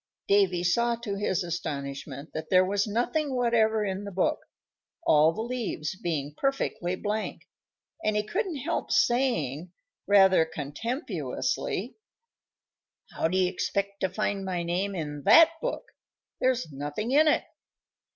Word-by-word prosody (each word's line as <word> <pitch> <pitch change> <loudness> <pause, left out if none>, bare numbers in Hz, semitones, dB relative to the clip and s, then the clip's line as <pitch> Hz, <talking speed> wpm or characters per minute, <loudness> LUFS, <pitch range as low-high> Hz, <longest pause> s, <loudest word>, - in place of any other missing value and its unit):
Davy 190 -3 +3
saw, 235 +7 +2
to 230 -3 -5
his 195 -2 -1
astonishment, 140 -4 -5
that 155 0 -5
there 185 0 +5
was 200 +2 0
nothing 260 +6 -1
whatever 225 -3 +2
in 195 0 -3
the 200 - -5
book, 185 0 +1 0.7
all 155 +1 +5
the 220 +7 -4
leaves 230 -10 -3
being 150 -6 -3
perfectly 230 - -1
blank, 210 +3 -3 0.6
and 215 - +1
he 210 - +1
couldn't 370 - -2
help 330 +6 -2
saying, 180 - +1 0.4
rather 190 -4 +6
contemptuously: 185 - -3 1.2
"How - - 0
do 185 +3 -1
you 185 -1 +3
expect 200 +2 -2
to 190 - 0
find 200 +1 -2
my 180 -2 -2
name 185 +4 -1
in 150 -4 -4
that 330 0 +8
book? - - -3 0.5
There's 255 -10 0
nothing 145 - -4
in 305 +3 +5
it." 300 - +3
195 Hz, 135 wpm, -27 LUFS, 170-235 Hz, 1.2 s, that